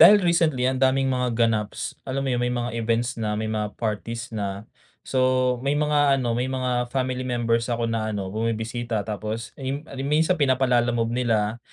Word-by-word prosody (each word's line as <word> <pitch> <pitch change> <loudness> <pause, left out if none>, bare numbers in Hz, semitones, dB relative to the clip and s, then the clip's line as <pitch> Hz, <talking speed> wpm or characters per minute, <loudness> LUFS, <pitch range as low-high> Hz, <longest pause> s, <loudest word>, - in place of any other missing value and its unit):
Dahil 210 0 +10
recently 165 -8 +2
ang 130 0 0
daming 135 +1 +3
mga 125 -1 0 0.2
ganaps, 105 -2 -2
alam 135 +1 -3
mo - - 0
'yun 120 0 0
may 125 - +1
mga 120 -1 -2
events 115 +1 0
na, 105 -1 -1
may 110 - -2
mga 105 -1 -2
parties 115 +2 -3
na, 100 0 -4 0.4
so 130 -1 +2
may 140 +1 +1
mga 145 -2 +3
ano 120 -2 0
may 125 +2 0
mga 125 -2 0
family 130 -1 -1
members 120 -1 0
ako 115 0 0
na 110 -1 -1
ano 100 -3 -3
bumibisita. 115 0 -2
Tapos, 110 +1 -4
eh, 135 -1 -3
mi 145 +2 -4 0.4
minsan 165 +3 +3
pinapa-Lalamove 120 -4 +2
nila, 115 -2 +1
120 Hz, 180 wpm, -24 LUFS, 110-130 Hz, 0.4 s, Dahil